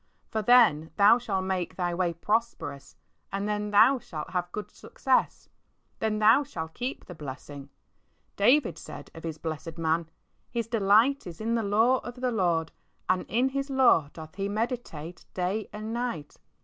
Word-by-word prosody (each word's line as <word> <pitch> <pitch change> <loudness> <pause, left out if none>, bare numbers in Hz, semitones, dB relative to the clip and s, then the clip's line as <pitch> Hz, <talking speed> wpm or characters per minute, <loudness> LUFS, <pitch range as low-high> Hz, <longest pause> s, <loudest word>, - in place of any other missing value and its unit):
"For 220 - 0
then 210 -10 +5
thou 210 +4 +6
shalt 195 -6 -2
make 185 -2 -2
thy 175 -2 -1
way 175 0 0
prosperous, 210 -7 -2 0.4
and 200 +1 -2
then 210 0 -1
thou 225 +6 +5
shalt 155 -8 -7
have 180 -1 -2
good 210 +2 -6
success." - - -1 0.5
Then 220 -1 0
thou 220 +6 +6
shalt 160 - -6
keep 250 +3 -5
the 180 - -9
blessing. 140 -2 -9 0.7
David 250 +6 +3
said - - -10
of 165 - -11
his 160 -2 -4
blessed 160 0 -6
man, 165 0 0 0.2
" - - -44
His 235 -1 -2
delight 225 +4 +3
is 170 -2 -9
in 225 +2 -1
the 230 - +1
law 225 +5 +3
of 245 - -8
the 255 0 -1
Lord, 175 -7 +1 0.4
and 185 0 +1
in 245 +4 +2
His 275 +1 -3
law 255 - +4
doth 160 0 -10
he 195 0 -2
meditate 205 - -4
day 190 +4 -2
and 215 +2 -6
night." 235 -12 -4
205 Hz, 170 wpm, -28 LUFS, 165-235 Hz, 0.7 s, thou